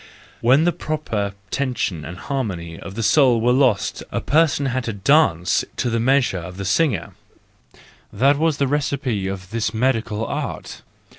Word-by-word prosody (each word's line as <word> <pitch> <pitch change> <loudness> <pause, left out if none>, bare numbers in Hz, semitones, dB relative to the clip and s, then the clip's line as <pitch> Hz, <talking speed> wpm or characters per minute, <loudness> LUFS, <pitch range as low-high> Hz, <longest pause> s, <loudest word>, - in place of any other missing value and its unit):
When 130 +6 +4
the 175 - +3
proper 115 -13 -3 0.2
tension 125 - -2
and 90 +2 -7
harmony 95 -13 -4
of 95 - -9
the 115 - -2
soul 125 -1 +4
were 120 +2 +2
lost 125 -6 +2
a - - -1
person 150 -1 +2
had 130 -2 -1
to 115 - -3
dance 100 - +3
to 120 - -1
the 115 - 0
measure 125 -5 +2
of 90 +2 -9
the 100 - -5
singer,—that 130 - -2
was 160 -2 +1
the 140 - +1
recipe 135 -7 -1
of 95 0 -6
this 110 -1 -2
medical 115 -2 0
art. - - -5
120 Hz, 155 wpm, -21 LUFS, 100-140 Hz, 0.2 s, When